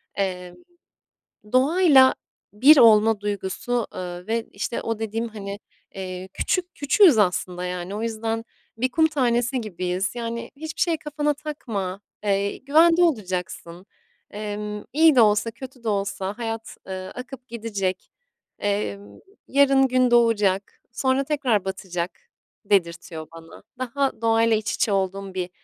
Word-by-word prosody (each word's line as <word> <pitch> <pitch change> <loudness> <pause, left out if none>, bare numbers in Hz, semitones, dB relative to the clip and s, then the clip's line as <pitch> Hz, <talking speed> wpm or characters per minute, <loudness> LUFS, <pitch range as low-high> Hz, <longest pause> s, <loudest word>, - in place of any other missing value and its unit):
emm, 180 -2 -3 1.0
doğayla 275 0 +5 0.4
bir 275 +9 +7
olma 225 -3 +6
duygusu, 205 +4 -2
eee, 180 0 -6
ve 225 +1 -1
işte - - -3
o 225 -1 -3
dediğim, 225 +1 -2
hani, 200 -2 -7 0.4
eee, 185 -1 -6
küçük 360 -1 -1
küçüğüz 295 - +5
aslında 180 -2 0
yani. 180 +2 -4
O 215 - -4
yüzden 225 0 -3 0.3
bir 255 +3 0
kum 320 +4 +4
tanesi 250 -3 0
gibiyiz, 185 -1 -3
yani, 235 0 -5
hiçbir 315 +2 -6
şey 335 -2 +2
kafana 295 0 -1
takma, 225 -11 -5 0.2
eee, 200 -1 0
güvende 330 +5 +4
olacaksın, 185 - -2 0.5
emm, 210 0 -5
iyi 315 0 +5
de 245 - +7
olsa 210 +1 +3
kötü 255 +1 -11
de 225 - -1
olsa 200 0 -2
hayat, 225 -1 -5
eee, 185 -1 -5
akıp 255 0 -9
gidecek, 205 -6 -3 0.5
emm, 205 0 -3 0.3
yarın 275 -1 +4
gün 255 -1 +2
doğacak, 210 -5 +2
sonra 260 +2 +1
tekrar 265 -9 0
batacak 180 -2 -4 0.5
dedirtiyor 170 -4 -1
bana. 165 +2 -13 0.2
Daha 260 0 -2
doğayla 225 0 +3
iç 215 - -3
içe 215 - 0
olduğum 195 0 -2
bir, 180 -1 -3
225 Hz, 130 wpm, -24 LUFS, 195-260 Hz, 1.0 s, bir